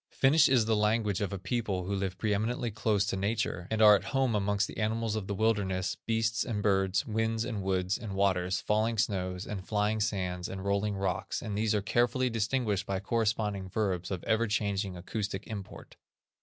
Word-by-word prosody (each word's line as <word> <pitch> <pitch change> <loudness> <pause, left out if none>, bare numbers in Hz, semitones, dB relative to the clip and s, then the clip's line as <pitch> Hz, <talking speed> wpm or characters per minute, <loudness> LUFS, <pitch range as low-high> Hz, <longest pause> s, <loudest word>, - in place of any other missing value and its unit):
Finnish 145 +3 +4
is 125 -4 +4
the 110 0 +2
language 105 -1 +1
of 100 - -1
a 100 - -3
people 100 -2 -2
who 100 - -2
live 95 -2 -2
pre 105 0 0
eminently 115 +3 -1
close 105 -1 +1
to 100 - -1
nature, 100 -3 -1
and 110 0 +2
are 105 -1 +9
at - - -2
home 135 -3 +1
amongst 100 0 +1
the - - -10
animals 110 0 0
of 105 -3 -3
the 100 - -2
wilderness, 100 -3 0
beasts 115 0 +1
and 105 -4 -3
birds, 95 +3 +2
winds, 110 -1 -1
and 110 -5 -3
woods, 95 0 0
and 105 -3 -6
waters, 95 -2 +1
falling 110 +2 +1
snows, 95 -3 -1
and 95 -2 -6
flying 105 +1 +1
sands, 90 -4 -2
and 95 0 -6
rolling 100 +1 0
rocks, 95 0 -2
and 105 - -5
these 110 +1 +1
are 105 - 0
carefully 120 +3 +1
distinguished 110 -3 0
by 95 -1 -1
corresponding 105 -2 -1
verbs 90 -3 -1
of 95 -3 -4
ever 115 +1 +1
changing 100 -3 -1
acoustic 100 +2 -4
import. 100 -3 -8
105 Hz, 195 wpm, -30 LUFS, 95-110 Hz, -, are